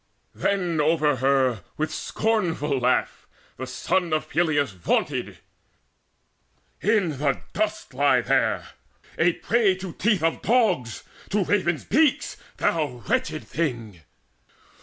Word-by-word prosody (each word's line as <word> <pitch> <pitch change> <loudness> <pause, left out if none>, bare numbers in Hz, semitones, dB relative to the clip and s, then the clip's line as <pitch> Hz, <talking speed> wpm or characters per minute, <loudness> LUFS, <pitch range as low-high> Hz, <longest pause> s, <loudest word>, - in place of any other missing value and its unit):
Then 180 -6 0
over 150 -2 +2
her 130 -4 +2 0.2
with 155 0 -2
scornful 170 -11 -1
laugh 125 +1 0 0.3
the 130 - -5
son 170 +6 -1
Of 155 - -1
Peleus 155 -6 +1
vaunted: 90 -3 -1 1.4
"In 195 -9 +1
the 140 -2 0
dust 215 -9 -2
lie 140 +2 +3
there - - +1 0.5
A 175 +1 +4
prey 220 -3 +2
to 185 -2 -7
teeth 205 -5 +1
of 165 0 +1
dogs, 195 - +1 0.3
to 205 0 +1
ravens' 175 -4 0
beaks, 295 +4 +2 0.2
Thou 145 -7 -1
wretched 255 -10 -1
thing! 120 - -3
160 Hz, 115 wpm, -24 LUFS, 140-200 Hz, 1.4 s, A